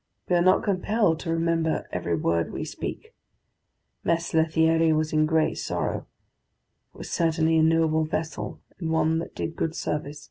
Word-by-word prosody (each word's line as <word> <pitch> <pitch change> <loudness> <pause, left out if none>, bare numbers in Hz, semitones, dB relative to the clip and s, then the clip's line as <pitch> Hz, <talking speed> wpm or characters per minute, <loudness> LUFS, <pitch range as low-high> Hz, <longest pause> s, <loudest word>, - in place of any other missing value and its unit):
We 180 - +2
are 175 - +4
not 185 +1 +4
compelled 200 -3 +1
to - - -6
remember 165 -1 0
every 85 -1 -1
word 85 +1 0
we - - -4
speak. - - -6 0.9
Mess 170 0 0
Lethierry 160 0 +3
was 155 0 0
in 155 0 +3
great 160 0 +1
sorrow. - - -3 0.8
It - - -20
was - - -8
certainly 160 -1 +2
a - - +4
noble 160 0 +3
vessel, 155 0 -4 0.2
and 165 -3 -3
one 160 0 +2
that 165 - -7
did 165 - -4
good 165 0 -2
service. 150 0 -3
160 Hz, 165 wpm, -26 LUFS, 155-165 Hz, 0.9 s, are